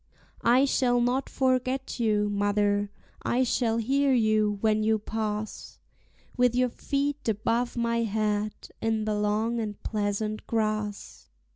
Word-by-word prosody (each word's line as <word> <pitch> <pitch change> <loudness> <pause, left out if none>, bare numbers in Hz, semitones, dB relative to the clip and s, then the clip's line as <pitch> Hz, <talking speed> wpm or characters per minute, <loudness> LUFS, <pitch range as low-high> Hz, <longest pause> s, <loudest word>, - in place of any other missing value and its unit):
I 250 +3 +5
shall 250 -3 +2
not 250 +3 0
forget 260 0 0
you, 210 -3 +2
mother; 205 0 +1 0.3
I 250 +2 +1
shall 230 -2 +1
hear 270 +4 +2
you 215 -2 +2
when 215 -1 +2
you 220 +1 +2
pass, 215 0 -4 0.6
With 245 -2 +3
your 250 0 +2
feet 280 +1 -2
above 230 +3 0
my 235 0 +1
head 215 -1 0 0.3
in 220 -1 0
the 215 - 0
long 210 +3 0
and 210 -2 -4
pleasant 215 0 -2
grass. 215 -2 -3
220 Hz, 130 wpm, -27 LUFS, 210-245 Hz, 0.6 s, I